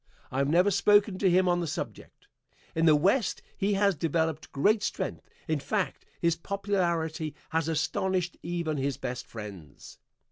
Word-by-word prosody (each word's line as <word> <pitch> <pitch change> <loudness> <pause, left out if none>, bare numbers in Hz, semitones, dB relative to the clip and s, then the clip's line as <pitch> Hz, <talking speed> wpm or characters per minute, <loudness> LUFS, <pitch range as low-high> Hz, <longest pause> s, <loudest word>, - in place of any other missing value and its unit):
I 130 - -1
have 140 0 +2
never 180 +6 +4
spoken 205 0 +4
to 195 - +4
him 185 +1 +4
on 175 0 +3
the 170 - -2
subject. - - -6 0.5
In 165 +1 +2
the 155 - +7
West 195 - +2
he 200 +1 0
has 200 0 +3
developed 160 0 -1
great 205 +10 +3
strength, - - -3 0.2
in - - 0
fact, - - -2
his 170 -1 +2
popularity 170 -4 -1 0.2
has 160 -1 0
astonished 175 +3 0
even 170 -3 -2
his 135 0 -1
best 125 0 -5
friends. 100 -10 -10
170 Hz, 155 wpm, -28 LUFS, 155-190 Hz, 0.5 s, the